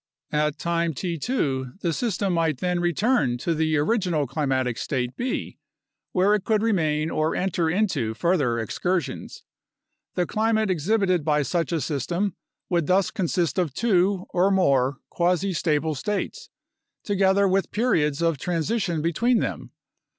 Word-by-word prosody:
At 150 0 0
time 170 -2 -1
t 170 +2 -3
2 135 - -1
the 170 -2 0
system 200 -2 -1
might 165 -4 +1
then 180 -1 0
return 175 - +1
to 165 +7 -1
the 155 -1 +1
original 170 -2 +1
climatic 130 -3 -1
state 125 -2 -2
B, 255 +2 -3 0.5
where 190 +3 +3
it 210 -3 +1
could 215 0 +1
remain 160 -8 +1
or 155 +1 0
enter 180 -3 0
into 160 - 0
further 145 -7 +1
excursions. 170 - -3 0.7
The 180 - +1
climate 220 +1 +1
exhibited 185 0 +1
by 150 -1 +2
such 165 +6 -1
a 165 - +1
system 170 +7 -2 0.3
would 170 -4 0
thus 190 +1 +2
consist 175 - 0
of 160 -7 -1
two 195 -4 +2
(or 180 +2 +3
more) 140 -9 +2
quasi 180 +2 +1
stable 155 -1 0
states, 200 +8 -4 0.5
together 200 0 +3
with 190 +1 +1
periods 170 - +1
of 165 -4 +1
transition 175 - -1
between 230 +9 +2
them. - - -3
170 Hz, 145 wpm, -24 LUFS, 150-195 Hz, 0.7 s, where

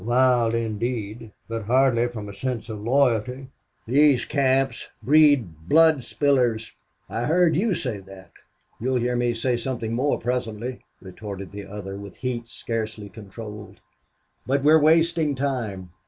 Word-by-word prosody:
"Wild 120 -1 +3
indeed. 115 -1 -3 0.2
But 115 -2 -4
hardly 125 0 +3
from 110 -4 -7
a 100 - -8
sense 120 +2 -4
of 105 -2 -6
loyalty. 125 +1 +1 0.4
These 135 +1 +4
camps 135 -3 +1 0.2
breed 130 - +3
blood 160 -2 +6
spillers. 125 -7 +1 0.4
I 115 +2 -3
heard 165 +1 +3
you 200 +3 +1
say 125 -10 -3
that." 95 0 -14 0.5
"You'll 130 +3 -1
hear 125 0 0
me 120 -1 0
say 120 +2 0
something 120 -2 -3
more, 130 +5 +1
presently," 120 0 -3 0.2
retorted 100 0 -8
the 100 -1 -8
other, 100 -1 -7
with 100 -1 -10
heat 120 -2 -4
scarcely 110 -3 -5
controlled. 105 +1 -10 0.7
"But 135 +1 +1
we're 155 +2 +6
wasting 160 -1 +3
time. 115 -10 -3
120 Hz, 140 wpm, -24 LUFS, 110-135 Hz, 0.7 s, blood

